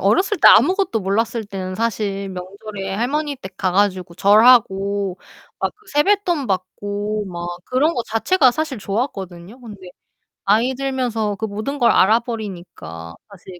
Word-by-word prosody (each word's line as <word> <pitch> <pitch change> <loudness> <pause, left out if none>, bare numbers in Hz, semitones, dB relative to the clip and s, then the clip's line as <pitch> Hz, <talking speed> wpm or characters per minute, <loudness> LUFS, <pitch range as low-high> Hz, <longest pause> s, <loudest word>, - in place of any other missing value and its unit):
어렸을 370 - +2
때 - - +5
아무것도 375 - +5
몰랐을 220 +4 -1
때는 190 -2 -6
사실 200 -2 -2
명절에 195 +1 -7
할머니댁 255 -4 -3
가 185 -2 -1
가지고 185 -3 0
절하고 200 -2 +4 0.4
막 - - -1
그 430 0 -28
세뱃돈 345 -1 +2
받고 205 +2 -3
막 175 -2 -6 0.2
그런 290 +6 +1
거 240 - -1
자체가 255 +5 +3
사실 310 -2 -3
좋았거든요. 195 -1 -5
근데 205 -6 -11 0.6
나이 230 +6 +2
들면서 250 -6 -2
그 220 - -4
모든 220 +7 -4
걸 240 - +4
알아 215 +5 +5
버리니까 175 - -8 0.2
사실 185 -2 -13
210 Hz, 305 characters per minute, -20 LUFS, 190-250 Hz, 0.6 s, 때